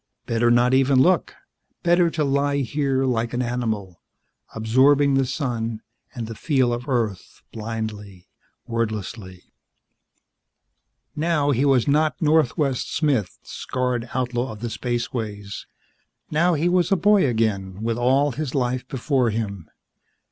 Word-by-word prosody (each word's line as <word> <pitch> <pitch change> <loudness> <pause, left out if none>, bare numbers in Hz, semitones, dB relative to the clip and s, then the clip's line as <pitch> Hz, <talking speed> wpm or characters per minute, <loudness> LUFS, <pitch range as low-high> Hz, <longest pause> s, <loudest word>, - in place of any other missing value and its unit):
Better 115 +1 +1
not 120 +1 +4
even 135 0 +4
look; 175 +4 +2 0.5
better 175 0 +4
to 155 -1 -1
lie 140 0 +1
here 135 0 0
like 120 -2 -1
an 120 - 0
animal, 110 -7 -3 0.5
absorbing 135 +6 +3
the 135 -1 +2
sun 115 -5 -3 0.3
and 120 -2 -4
the 115 - -6
feel 130 -2 +1
of 120 +4 -5
Earth 110 -7 -2
blindly, 105 -4 -6 0.4
wordlessly. 110 -5 -4 1.7
Now 150 -2 +1
he 135 +1 +1
was 135 -4 +3
not 150 0 +2
Northwest 150 -4 +1
Smith, 130 - 0
scarred 125 -2 -3
outlaw 125 -1 -1
of 105 - -12
the 120 -1 -4
spaceways. 110 -4 -4 0.6
Now 170 +3 +3
he 160 +3 +1
was 180 0 +2
a - - +5
boy 195 -2 +4
again 105 -4 -1
with 115 +1 -1
all 135 +4 +3
his 145 +1 -4
life 125 -1 -1
before 130 -2 0
him. 100 -6 -4
125 Hz, 130 wpm, -23 LUFS, 115-140 Hz, 1.7 s, a